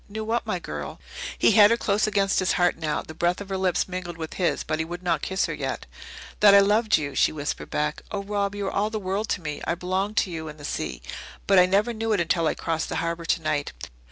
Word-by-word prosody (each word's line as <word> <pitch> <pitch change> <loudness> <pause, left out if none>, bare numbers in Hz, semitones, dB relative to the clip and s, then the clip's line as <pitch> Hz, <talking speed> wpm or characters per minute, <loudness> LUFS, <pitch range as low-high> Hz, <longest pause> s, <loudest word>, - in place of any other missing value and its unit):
"Knew 220 +1 -5
what, 230 +2 -1
my - - 0
girl?" - - -6 0.4
He - - +5
had 205 0 +8
her 230 - +3
close 210 -1 +1
against 200 -2 +2
his 185 - +2
heart 175 -2 +2
now; 155 -2 -2
the 155 - -10
breath 175 +2 0
of 200 -1 -8
her 195 - -2
lips 185 -2 +1
mingled 180 -2 -5
with 160 -1 -6
his, 180 -3 0
but 155 0 -2
he - - +1
would 175 +2 -7
not 175 - +1
kiss 190 0 0
her - - -3
yet. - - -4 0.5
"That 205 -1 +8
I - - +9
loved 210 +2 +4
you," 145 -3 -4
she - - +3
whispered 150 -1 -4
back. 150 0 -1
"Oh, 200 -1 -3
Rob, 200 0 -1
you 205 -1 -3
are - - -2
all 210 +2 0
the 220 - -3
world 200 +2 -2
to 180 - -1
me. 150 -2 -4
I 170 - +1
belong 185 +4 -2
to 190 - +1
you 160 -1 -5
and 150 0 -9
the 145 - -8
sea. 60 - -4 0.4
But 195 -2 +5
I 180 - +6
never 205 +5 +2
knew 225 0 -1
it 205 - +1
until 170 -1 +1
I - - 0
crossed 165 -1 -2
the - - -3
harbour 170 0 -2
tonight. 155 -3 -1
185 Hz, 260 wpm, -25 LUFS, 165-205 Hz, 0.5 s, I